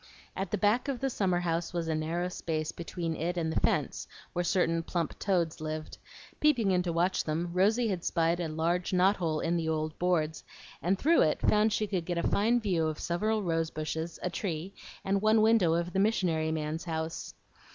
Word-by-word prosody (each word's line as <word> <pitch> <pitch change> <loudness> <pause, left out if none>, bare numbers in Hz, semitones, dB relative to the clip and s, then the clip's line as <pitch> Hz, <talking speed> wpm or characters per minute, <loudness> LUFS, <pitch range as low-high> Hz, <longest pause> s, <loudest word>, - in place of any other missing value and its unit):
At 195 -1 -3
the 210 - -1
back 210 +7 +2
of 270 -3 -2
the 270 +1 -1
summer 185 -5 +1
house 170 0 -1
was 170 -2 -2
a 160 - 0
narrow 165 +3 -1
space 160 -3 -3
between 170 -1 -4
it 175 +3 -2
and 160 -2 0
the - - +1
fence - - 0 0.3
where 175 - 0
certain 165 -2 +1
plump 165 -1 -3
toads 175 -6 0
lived; 155 0 -5 0.4
peeping 245 -10 +3
in 180 -1 +3
to 175 -1 -2
watch 175 +3 +1
them, 165 +3 -2
Rosy 215 +6 +3
had 180 -4 -2
spied 165 +1 +1
a 170 - -1
large 170 +4 -1
knot 185 +3 +4
hole 160 -3 -1
in 170 +1 0
the 160 -1 -1
old 155 0 -2
boards, 160 -3 0 0.4
and 185 +3 +1
through 325 - +4
it 155 - +2
found 215 +1 +3
she 215 0 +1
could 190 -5 -2
get 175 0 -2
a 170 - +1
fine 230 +4 +2
view 180 -8 0
of 155 -1 -3
several 215 +5 -1
rose 165 -2 0
bushes, 160 +2 -4
a 180 - -1
tree, 175 0 -4 0.3
and 195 0 +1
one 215 +1 +4
window 215 -7 +4
of 170 +1 -2
the 195 - +1
"missionary 175 -7 +1
man's" 155 +1 -3
house. 160 -1 -4
175 Hz, 205 wpm, -30 LUFS, 160-195 Hz, 0.4 s, knot